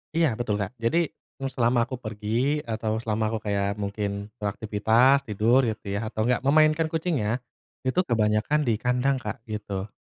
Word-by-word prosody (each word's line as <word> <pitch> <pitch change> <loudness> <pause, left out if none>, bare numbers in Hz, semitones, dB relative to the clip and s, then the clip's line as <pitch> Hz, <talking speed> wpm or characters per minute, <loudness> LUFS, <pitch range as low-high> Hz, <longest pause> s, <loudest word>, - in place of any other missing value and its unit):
Iya 165 0 +4
betul, 115 -4 0
Kak, 100 - -3
jadi 160 +8 +1 0.4
selama 120 -1 +3
aku 130 - -5
pergi 115 +7 -1
atau 110 -1 -2
selama 110 0 -1
aku 110 0 -2
kayak 100 0 0
mungkin 100 0 -3
beraktivitas, 110 +6 +3
tidur 110 +4 +3
gitu 110 -1 -4
ya, - - 0
atau 110 -1 -2
enggak 125 0 +2
memainkan 155 +2 +4
kucingnya, 145 -8 -1 0.4
itu 130 +7 +1
kebanyakan 110 +6 +2
di 120 - +2
kandang, 125 +2 +1
Kak, 125 -2 -6
gitu. 100 -2 -4
115 Hz, 155 wpm, -26 LUFS, 105-135 Hz, 0.4 s, Iya